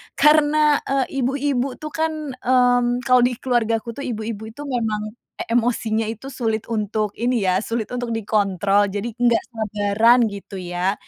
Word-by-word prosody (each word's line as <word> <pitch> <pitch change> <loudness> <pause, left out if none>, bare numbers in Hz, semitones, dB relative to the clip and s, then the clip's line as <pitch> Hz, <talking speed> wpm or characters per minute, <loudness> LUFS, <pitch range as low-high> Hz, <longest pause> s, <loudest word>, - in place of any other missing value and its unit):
karena, 300 0 +4
eee, 270 0 -1
ibu-ibu 270 -1 -1
tuh 305 - -5
kan, 320 0 0 0.2
mmm, 245 -1 +2
kalau 255 -1 +5
di 250 - +1
keluargaku 235 -2 0
tuh 280 - -5
ibu-ibu 220 -2 -5
itu 290 - -10
memang 215 -4 -2 0.2
e - - -5
emosinya 230 -2 +1
itu 225 +5 -6
sulit 225 -4 -3
untuk 215 -1 -1
ini 240 0 0
ya, 185 0 +3
sulit 230 -2 -3
untuk 245 -1 -3
dikontrol, 205 -2 +1
jadi 205 +4 -3
nggak 240 -1 +2
sabaran 220 +1 +2
gitu 200 -1 -8
ya. 180 +2 -1
230 Hz, 150 wpm, -21 LUFS, 215-255 Hz, 0.2 s, kalau